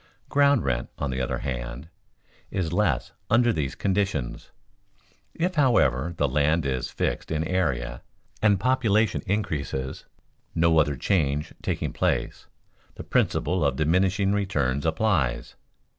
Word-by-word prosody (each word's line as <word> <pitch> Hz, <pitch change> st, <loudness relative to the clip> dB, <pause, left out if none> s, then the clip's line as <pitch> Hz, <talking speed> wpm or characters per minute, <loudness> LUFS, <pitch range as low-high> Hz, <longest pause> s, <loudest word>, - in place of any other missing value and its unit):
Ground 140 Hz, -3 st, +4 dB
rent, 65 Hz, -1 st, -1 dB
on 70 Hz, -2 st, -2 dB
the 65 Hz, +1 st, -2 dB
other 60 Hz, -, -1 dB
hand, 65 Hz, +2 st, -5 dB, 0.6 s
is 85 Hz, -4 st, -2 dB
less 90 Hz, -10 st, +1 dB, 0.2 s
under 120 Hz, +1 st, +4 dB
these 70 Hz, -6 st, -2 dB
conditions. 95 Hz, -10 st, -1 dB, 0.9 s
If, 180 Hz, +2 st, 0 dB
however, 100 Hz, -, +2 dB
the 70 Hz, -, +2 dB
land 75 Hz, +4 st, +1 dB
is 65 Hz, -2 st, -1 dB
fixed -, -, -2 dB
in 80 Hz, -1 st, -1 dB
area, 70 Hz, -10 st, -1 dB, 0.4 s
and 105 Hz, -3 st, +4 dB
population 115 Hz, -3 st, +2 dB
increases, 75 Hz, -10 st, -2 dB, 0.5 s
no 80 Hz, -1 st, +4 dB
other 75 Hz, -2 st, +2 dB
change 75 Hz, -2 st, 0 dB
taking -, -, -2 dB
place, -, -, -1 dB, 0.5 s
the -, -, -7 dB
principle 90 Hz, +1 st, +1 dB
of 70 Hz, -2 st, +1 dB
diminishing 95 Hz, +6 st, +2 dB
returns 80 Hz, -9 st, 0 dB
applies. 80 Hz, -, 0 dB
80 Hz, 125 wpm, -25 LUFS, 70-100 Hz, 0.9 s, Ground